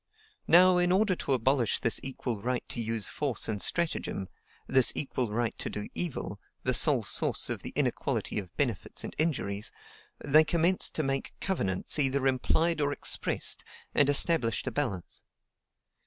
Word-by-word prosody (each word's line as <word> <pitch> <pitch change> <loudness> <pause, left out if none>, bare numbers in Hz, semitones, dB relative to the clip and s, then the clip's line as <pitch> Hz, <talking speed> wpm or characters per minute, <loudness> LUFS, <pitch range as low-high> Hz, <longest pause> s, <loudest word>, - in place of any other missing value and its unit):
Now, 180 +1 +6
in 175 0 +2
order 195 0 +2
to 140 - -1
abolish 130 -1 +1
this 115 - +2
equal 125 -5 -4
right 125 +2 -2
to 120 - -3
use 115 -2 -2
force 140 -5 -1
and 105 -3 -3
stratagem, 160 - -1 0.4
this 130 -2 +4
equal 130 -5 -1
right 115 +1 -1
to - - -4
do 105 0 -6
evil, 175 -5 -1 0.2
the - - +1
sole - - +4
source - - -1
of - - -3
the - - -4
inequality - - -1
of 95 -4 -10
benefits 125 -8 -1
and - - -6
injuries, 110 -11 -1 0.5
they 150 +2 +4
commenced 170 +3 +1
to 155 - 0
make 135 -1 -3
COVENANTS 100 - -1
EITHER 135 -1 +1
IMPLIED 160 +5 +1
OR 145 0 +1
EXPRESSED, - - 0 0.3
and 145 -1 +3
established 145 -5 +2
a 130 - -2
balance. 105 -10 -3
135 Hz, 155 wpm, -29 LUFS, 115-160 Hz, 0.5 s, Now